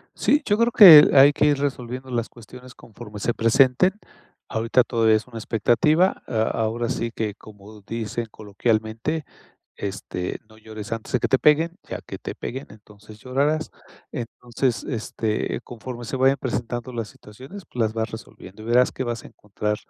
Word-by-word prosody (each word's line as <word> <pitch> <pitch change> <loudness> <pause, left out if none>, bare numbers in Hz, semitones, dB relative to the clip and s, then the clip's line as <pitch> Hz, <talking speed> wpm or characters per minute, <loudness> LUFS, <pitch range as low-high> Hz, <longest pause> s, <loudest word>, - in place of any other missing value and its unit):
Sí, 295 - +2
yo 205 0 +1
creo 235 0 +2
que 165 -8 +10
hay 140 +2 +8
que 150 - +1
ir 145 -2 +2
resolviendo 130 -2 -4
las 120 -1 -2
cuestiones 125 +2 -14
conforme 105 -2 -11
se 120 - -1
presenten. 130 +9 +3 0.6
Ahorita 115 +3 +2
todavía 115 -2 +2
es 110 - -4
una 120 -3 -9
expectativa. 150 - +2
A 110 -2 0
ahora 115 +1 -1
sí 115 0 -2
que 105 -3 -3
como 105 0 -15
dicen 115 +2 -4
coloquialmente, 110 +8 -2 0.5
este: 95 -2 -5
"No 110 0 -18
llores 110 -1 -9
antes 115 -1 -5
de 125 - +1
que - - 0
te 130 - +3
peguen, 160 +4 +3
ya - - -5
que - - -8
te - - -7
peguen, 130 +3 -6
entonces, 105 0 -16
llorarás". 145 +5 -1 0.4
Entonces, 120 0 -3
este, 110 -3 -3
conforme 120 0 -8
se 120 - -4
vayan 135 +1 +3
presentando 120 -1 -4
las 115 -3 -4
situaciones, 130 - -12
pues, 125 - -6
las 110 - 0
vas 110 0 -2
resolviendo 110 -2 -11
y - - -10
verás 125 +2 +4
que 130 - -4
vas 120 -1 -4
a - - -10
encontrar 105 +1 -4
120 Hz, 170 wpm, -23 LUFS, 110-130 Hz, 0.6 s, que